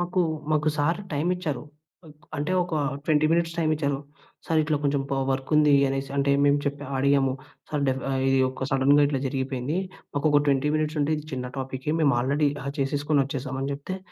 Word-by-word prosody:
మాకు, 180 +1 0 0.3
మాకు 155 0 +2
sir 165 +6 +1
time 145 +3 0
ఇచ్చారు. 160 -6 -3 0.7
అంటే 150 +5 -1
ఒక 175 -2 -4 0.3
20 155 -1 +3
మినిట్స్ 170 0 +1
టైమ్ 155 -2 +1
ఇచ్చారు. 140 -2 -1 0.5
"సార్ 160 - +2
ఇట్లా 150 0 0
కొంచెం 140 -1 +1
పా 135 - 0
వర్క్ 135 0 -2
ఉంది" 150 -1 +5
అనేసి 135 0 -3
అంటే 140 0 +2
మేము 145 0 +4
చెప్పా 145 -1 -3
అడిగాము. 135 -1 +3 0.4
"సార్ 150 -2 -1
డెఫ్ 130 0 -1
ఆహ్, 135 -1 0
ఇది 135 0 +3
ఒక 130 0 -4
సడన్‌గా 140 +2 +4
ఇట్లా 140 -2 -1
జరిగిపేంది 130 +2 -2 0.4
మాకు 145 +1 0
ఒక 145 - +5
20 140 +1 +2
మినిట్స్ 155 0 -1
ఉంటే 145 +2 +1
ఇది 150 - -7
చిన్న 125 -1 -3
టాపికే 130 +2 -3
మేము 145 -4 +4
ఆల్రెడీ 145 +4 +2
డ్రా 140 - -7
చేసేసుకొని 145 +2 +1
వచ్చేసామని" 135 0 -4
చెప్తే, 145 +7 -6
145 Hz, 185 wpm, -25 LUFS, 135-150 Hz, 0.7 s, ఉంది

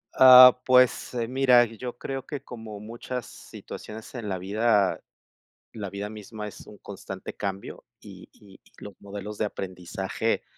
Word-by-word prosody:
Ah, 125 -1 +9
pues 130 -1 +3
mira, 125 -1 +4
yo 120 +2 -8
creo 135 0 -5
que, 145 -3 -6
como 110 -5 -9
muchas 120 +3 -6
situaciones 110 +3 -11
en 115 -5 -6
la 95 - -2
vida, 100 +1 +1 0.7
la 100 -3 -6
vida 100 +1 -6
misma 105 0 -8
es 100 - -14
un 105 - -13
constante 95 -1 -8
cambio. 100 -1 -6 0.2
Y - - -13
y 100 -2 -18
y - - -27
los 105 - -10
modelos 100 +1 -8
de 110 - 0
aprendizaje 95 +3 -4
105 Hz, 150 wpm, -26 LUFS, 100-125 Hz, 0.7 s, Ah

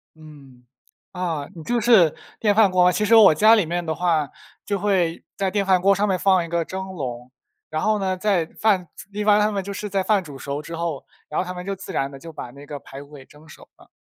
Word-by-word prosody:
嗯。 140 -5 -16 0.5
啊， 165 -6 -3
你 165 - -9
这 240 0 0
是 210 -10 +5 0.2
电 205 -2 +2
饭 215 -4 +5
锅 180 -1 +4
啊， 180 - +5
其 210 - -1
实 225 +2 +4
我 195 -8 +7
家 215 +6 +6
里 210 -7 +3
面 175 +1 -3
的 160 - -1
话， 160 -4 0 0.4
就 200 -2 -2
会 180 -5 0
在 195 -2 -1
电 200 -2 0
饭 185 -2 +3
锅 200 +1 +4
上 205 +2 0
面 190 -2 +1
放 185 -2 +2
一 - - -9
个 170 0 -1
蒸 190 +3 -6
笼， 125 -8 -6 0.4
然 155 0 -3
后 215 -1 +1
呢， 190 -1 -1
在 185 -4 +1
饭 190 -1 0 0.2
一 210 +1 -4
般 210 -1 +5
它 210 +1 +2
们 200 -1 -2
就 200 +1 -6
是 210 +1 -5
在 190 -1 0
饭 200 -1 +2
煮 145 -4 -10
熟 140 +2 -5
之 165 +2 -10
后， 165 -4 -4 0.2
然 150 - -5
后 - - -2
它 180 0 -6
们 180 0 -8
就 195 0 -3
自 190 - -9
然 135 0 -1
地 135 - -11
就 165 +4 -11
把 145 -5 -8
那 140 +2 -13
个 145 -1 -7
排 135 +2 -11
骨 145 +1 -19
给 135 -2 -12
蒸 150 +2 -19
熟 - - -15
了。 - - -20
180 Hz, 280 characters per minute, -22 LUFS, 155-200 Hz, 0.5 s, 我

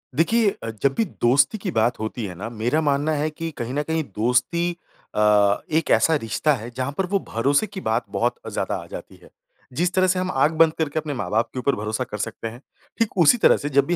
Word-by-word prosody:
देखिए 215 - +3
अ, 115 - -3
जब 140 - +3
भी 225 - +1 0.2
दोस्ती 135 - +4
की 190 -3 -4
बात 115 +2 +1
होती 110 +1 -4
है 95 - -6
ना, 105 +6 -6
मेरा 120 +6 0
मानना 145 +1 +1
है 150 +1 0
कि 165 +2 -5
कहीं 120 +2 -4
न 145 - 0
कहीं 160 +1 -1
दोस्ती 125 +10 +1 0.5
अ, - - 0 0.5
एक 160 +1 +1
ऐसा 160 - +4
रिश्ता 145 +3 0
है 115 0 -7
जहाँ 130 +2 -2
पर 190 - +1
वो 200 - +2
भरोसे 140 - +1
की 190 -1 -8
बात 115 -2 0
बहुत 115 +5 0 0.2
ज़्यादा - - -2
आ - - -13
जाती - - -9
है। - - -16 0.4
जिस 175 +6 0
तरह 185 0 +3
से 185 0 +1
हम 185 0 -1
आँख 135 +4 +2
बंद 165 -1 +6
करके 155 -1 -1
अपने 150 -2 -4
माँ-बाप 115 -3 -1
के 130 - -4
ऊपर 140 +2 +1
भरोसा 110 +3 -2
कर 105 -4 -7
सकते 115 +2 -4
हैं। 120 +3 -9 0.4
ठीक 225 -3 0
उसी 175 +7 +6
तरह - - +5
से 145 - -4
जब 140 0 +3
भी 175 - 0
140 Hz, 235 wpm, -23 LUFS, 115-165 Hz, 0.5 s, बंद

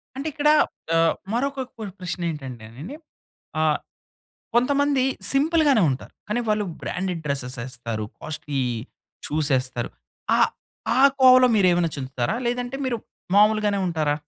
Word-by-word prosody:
అంటే 275 +4 -4
ఇక్కడా, 300 0 +4 0.4
ఆహ్, 165 0 +4 0.2
మరొక 275 +2 -1
క్వ 225 - -8 0.2
ప్రశ్నేంటంటేనండి, 150 - -6 0.7
ఆహ్, 155 -1 +2 0.8
కొంతమంది 275 +2 +2 0.3
సింపుల్‌గానే 290 - +3
ఉంటారు. 130 - -5 0.2
కానీ 225 +3 0
వాళ్ళు 210 -1 +1 0.2
బ్రాండెడ్ 180 -3 -3
డ్రెస్సెస్ 130 -3 -2
యేస్తారు. 115 -4 -5
కాస్ట్‌లి 150 -2 -4 0.7
చూసేస్తరు. 135 -5 0 0.5
ఆ, - - +1 0.6
ఆ - - +5 0.2
కోవలో 255 0 +8
మీరేమన్నా 175 -4 +3
చేందుతారా? 130 - -2
లేదంటే 245 +2 -2
మీరు 250 -2 0 0.4
మామూలుగానే 210 -1 +4
ఉంటారా? 155 -4 0
180 Hz, 110 wpm, -23 LUFS, -, 0.8 s, కోవలో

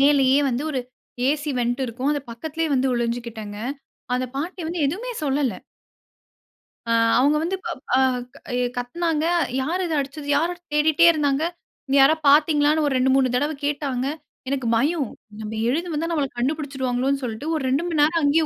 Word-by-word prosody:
மேலேயே 275 -1 +5
வந்து 250 +1 -1
ஒரு 265 - -1 0.5
ஏசி 295 +1 0
வென்ட் 245 +1 0
இருக்கும். 250 +5 -2
அது 290 - -1
பக்கத்துலேயே 315 +6 -3
வந்து 260 +1 +2
ஒளிஞ்சுகிட்டேங்க. 235 -3 -3 0.6
அந்த 255 0 0
பாட்டி 345 +6 -4
வந்து 340 0 -3
எதுவுமே 430 - -3
சொல்லல. 275 -3 +1 1.4
அ - - 0 0.3
அவங்க 285 +4 +4
வந்து 355 +3 -1
பப் 330 -6 -5 0.2
அ - - +4 0.6
எ 250 - +1
கத்துனாங்க. 310 +5 -1 0.4
"யார் 340 +8 -1
இத 330 - -2
அடிச்சது? 280 +1 -5
யாரு?" 335 +4 +1 0.2
தேடிட்டே 310 +2 +4
இருந்தாங்க. 290 -2 +1 0.4
"இங்க 270 - +1
யாராவது 315 +3 +4
பாத்தீங்களான்னு?" 300 +1 +4
ஒரு 280 - 0
2,3 260 0 +3
தடவ 290 +4 +1
கேட்டாங்க. 280 -3 -1 0.4
எனக்கு 265 -4 -1
பயம். 285 +1 +1 0.3
நம்ம 215 0 -5 0.2
எழுந்து 335 +7 -1
வந்தா 325 +3 -1
நம்மள 295 -4 0
கண்டுபிடிச்சுடுவாங்களோன்னு 270 -1 -1
சொல்லிட்டு 235 +5 -4
ஒரு 305 - -2
2 275 +5 +1
மணி 340 -3 -2
நேரம் 320 +3 +3
அங்கேயே 310 +3 +3
285 Hz, 155 wpm, -23 LUFS, 255-315 Hz, 1.4 s, மேலேயே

